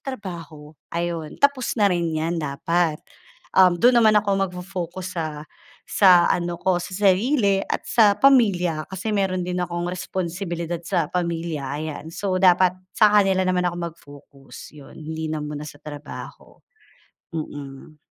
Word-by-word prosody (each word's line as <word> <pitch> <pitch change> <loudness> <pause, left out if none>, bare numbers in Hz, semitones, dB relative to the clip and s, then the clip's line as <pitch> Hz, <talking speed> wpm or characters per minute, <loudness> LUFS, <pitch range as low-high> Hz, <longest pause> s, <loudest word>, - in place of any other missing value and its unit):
trabaho, 170 - -8 0.2
ayun 170 -2 -3
tapos 280 -4 +1
na 205 -4 +3
rin 170 -1 0
'yan 165 +1 -1
dapat. 155 +3 0 0.6
Um, 185 -2 +7
do'n 240 +7 +4
naman 215 -2 +5
ako 205 -1 +2 0.2
magfo-focus 180 0 -6
sa 165 - -1 0.6
sa 180 -3 +5
ano 175 -1 -1
ko 185 0 +1
sa 185 - -8
sarili 200 +1 +2
at - - -3
sa 210 -3 +4
pamilya, 190 - +3
kasi 195 +3 -3
meron 185 -3 0
din 180 0 -2
akong 175 0 -3
responsibilidad 175 -1 -4
sa 165 -2 0
pamilya 170 -4 -2 0.2
ayan. 155 0 -6
So 190 0 -2
dapat 180 0 +5 0.2
sa 215 - +6
kanila 190 -1 +2
naman 180 -1 +1
ako 175 - -5 0.2
mag-focus 145 -2 -14
'yon 140 -2 -14
hindi 160 0 -5
na 155 - -2
muna 150 0 -6
sa 145 - -13
trabaho. 145 -1 -10 0.8
Mm. 145 -1 -7
175 Hz, 140 wpm, -23 LUFS, 160-190 Hz, 0.8 s, Um